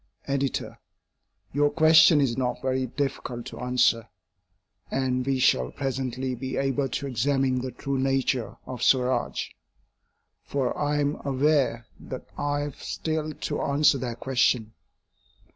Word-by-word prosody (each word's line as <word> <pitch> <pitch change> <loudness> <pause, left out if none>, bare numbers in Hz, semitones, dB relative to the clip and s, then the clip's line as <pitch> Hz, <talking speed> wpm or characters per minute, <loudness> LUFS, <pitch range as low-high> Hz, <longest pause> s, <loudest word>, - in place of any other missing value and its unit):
EDITOR: 140 -1 -2 0.7
Your 145 +1 +3
question 160 0 +6
is 125 -4 +1
not 125 -2 -1
very 130 0 0
difficult 125 -2 -3
to - - -8
answer, 125 -2 +2 0.8
and 130 -1 0
we 135 -1 +2
shall 65 - +3
presently 130 -1 -3
be 130 +2 -4
able 135 0 0
to 140 - -3
examine 135 0 +1
the 130 - -3
true 140 +1 -3
nature 135 -2 0
of 125 -2 -7
Swaraj; 125 -2 +1 0.9
for 135 -3 -1
I 145 0 0
am 145 0 0
aware 135 -4 +1
that - - -8
I 145 0 -1
have 145 -2 -6
still 155 -1 -3
to - - -4
answer 140 -1 +3
that 120 -1 -4
question. 120 -4 +1
135 Hz, 130 wpm, -26 LUFS, 125-145 Hz, 0.9 s, question